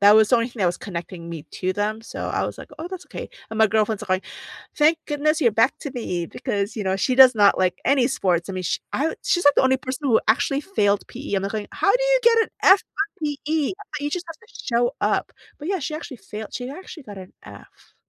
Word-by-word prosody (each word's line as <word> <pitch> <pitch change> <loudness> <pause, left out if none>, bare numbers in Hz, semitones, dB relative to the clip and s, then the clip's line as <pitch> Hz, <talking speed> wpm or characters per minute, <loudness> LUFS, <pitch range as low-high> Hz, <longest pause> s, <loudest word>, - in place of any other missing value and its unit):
That 205 +1 +8
was 215 -1 +6
the 245 - +6
only 230 +2 0
thing 235 -3 -10
that 185 - +3
was 175 - 0
connecting 170 -3 -7
me 165 -2 -7 0.2
to 185 0 0
them, 215 +2 -2
so - - -6
I - - 0
was - - -7
like, - - -10
"Oh, 325 +2 -5
that's 365 -1 -8
okay." - - -7 0.2
and 220 - -5
my 220 - +6
girlfriend's 215 0 +1
are - - -16
going, 185 0 0 0.5
"Thank 315 +2 +4
goodness 305 +2 +1
you're 235 -6 +4
back 225 +5 +2
to 285 - -5
me," 180 -9 -3
because, 200 +6 -3
you 215 - -2
know, 190 0 +1
she 255 +6 +1
does 260 -1 +8
not 205 -2 +5
like 185 -1 +1
any 265 -2 +3
sports. 180 -7 0
I - - -4
mean, 185 - -3
she - - -1
I 305 +4 +1
wa - - -4
she's 350 -2 +1
like 285 - +6
the - - +5
only 260 0 +4
person 260 +2 -4
who 225 - +4
actually 275 +5 +2
failed 205 - +1
PE, 255 -4 -5
I'm, 190 - 0
like, 200 - -3
going, 215 -2 -4
"How 395 - +2
do - - +2
you - - +4
get 460 0 +5
an - - -13
F 380 +1 +7
on 395 +2 -2 0.2
PE? 295 0 -1
I - - -3
thought 310 -7 -8
you 290 - -1
just 355 +1 -3
have 330 - -8
to - - -22 0.2
show 240 +2 +3
up." - - 0 0.3
but, 300 - -6
yeah, 390 0 0
she 305 +2 -3
actually 305 -5 -7
failed, 210 +2 -8
she 245 0 -4
actually 320 -1 -10
got 205 -3 -9
an 185 -1 -11
F. - - -15
245 Hz, 270 wpm, -23 LUFS, 200-305 Hz, 0.5 s, That